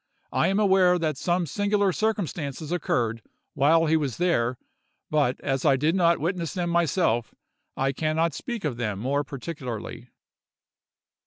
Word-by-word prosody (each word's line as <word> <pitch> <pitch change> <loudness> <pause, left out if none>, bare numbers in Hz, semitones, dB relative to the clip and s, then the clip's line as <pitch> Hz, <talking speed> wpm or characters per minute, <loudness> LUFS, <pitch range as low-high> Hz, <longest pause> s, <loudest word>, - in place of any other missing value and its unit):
I - - +2
am 195 +2 +1
aware 190 -3 +4
that 155 -3 -1
some 175 +5 0
singular 205 +5 +1
circumstances 165 - -2
occurred 120 -9 -1 0.3
while 160 +4 +4
he 160 0 +3
was 145 -6 -1
there; 130 -9 +1 0.5
but 145 -4 +1
as 135 -1 -1
I 140 -3 +5
did 150 +5 +1
not 170 -2 +3
witness 170 0 -2
them 175 -2 -1
myself, 165 -9 +1 0.4
I 135 +1 +1
can 155 +3 -1
not 165 0 +1
speak 235 - -5
of 130 -6 -2
them 105 -5 -2
more 135 +7 0
particularly. 125 -5 -7
155 Hz, 150 wpm, -25 LUFS, 135-175 Hz, 0.5 s, I